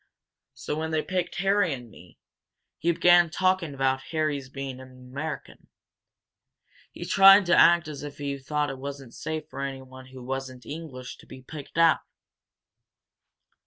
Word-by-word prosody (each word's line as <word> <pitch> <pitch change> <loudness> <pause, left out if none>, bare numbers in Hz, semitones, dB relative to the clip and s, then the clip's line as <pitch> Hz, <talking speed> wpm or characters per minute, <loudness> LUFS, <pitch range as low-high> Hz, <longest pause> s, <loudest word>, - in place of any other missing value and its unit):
So - - -4
when 160 0 -2
they 155 -1 0
picked 180 -2 -2
Harry 195 -1 +2
and 120 -3 -12
me, 90 -3 -16 0.6
he 170 - +2
began 175 0 +5
talking 185 -3 0
about 135 0 +1
Harry's 150 -4 -1
being 135 -1 -6
an 130 0 -11
American. 140 +5 -7 1.2
He - - -8
tried 195 0 +7
to 175 - +4
act 170 -1 +6
as 150 -2 -7
if 145 -1 -8
he 140 -1 -4
thought 150 +2 -1
it 135 - -8
wasn't 135 -3 -7
safe 155 -1 -5
for 140 - -7
anyone 130 -1 -7
who 130 -1 -11
wasn't 130 -1 -5
English 145 -3 -8
to - - -18
be 130 - -12
picked 145 +3 -10
out!" 165 -1 +5
145 Hz, 155 wpm, -26 LUFS, 130-165 Hz, 1.2 s, tried